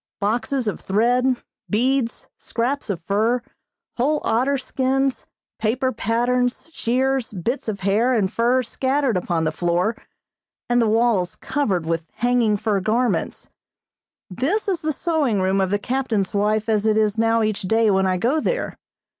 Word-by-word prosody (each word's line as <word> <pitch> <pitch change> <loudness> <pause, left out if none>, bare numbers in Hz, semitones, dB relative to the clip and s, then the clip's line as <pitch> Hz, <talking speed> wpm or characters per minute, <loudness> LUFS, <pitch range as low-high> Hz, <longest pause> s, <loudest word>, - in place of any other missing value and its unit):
Boxes 230 +4 -1
of 210 - -2
thread, 245 +6 +2 0.3
beads, 245 +2 0
scraps 245 +3 -3
of 190 -5 -2
fur, 220 +7 +1 0.5
whole 295 +5 +2
otter 255 +5 +1
skins, 265 0 -1 0.3
paper 255 +4 0
patterns, 245 +4 0
shears, 260 -1 0
bits 220 +8 -3
of 200 -3 -4
hair 220 +7 +2
and 205 -2 0
fur 245 +2 +2
scattered 265 +1 0
upon 175 -2 0
the 155 - +1
floor, 175 +6 0 0.7
and 240 0 +3
the 230 - +2
walls 220 -5 +2
covered 200 - -1
with 165 0 -2
hanging 240 -3 +2
fur 210 -1 0
garments; 230 +6 -1 0.8
this 275 - -1
is 365 -4 0
the 310 -1 0
sewing 295 - 0
room 190 +1 +1
of 190 - +1
the 205 - +1
captain's 230 -4 -1
wife 210 +2 +1
as 215 -1 +1
it 215 0 +3
is 215 0 +1
now 225 0 +3
each 215 -2 -1
day 220 +3 +2
when 190 0 +2
I 185 -1 +1
go 255 - +1
there. - - -2
230 Hz, 155 wpm, -22 LUFS, 205-255 Hz, 0.8 s, and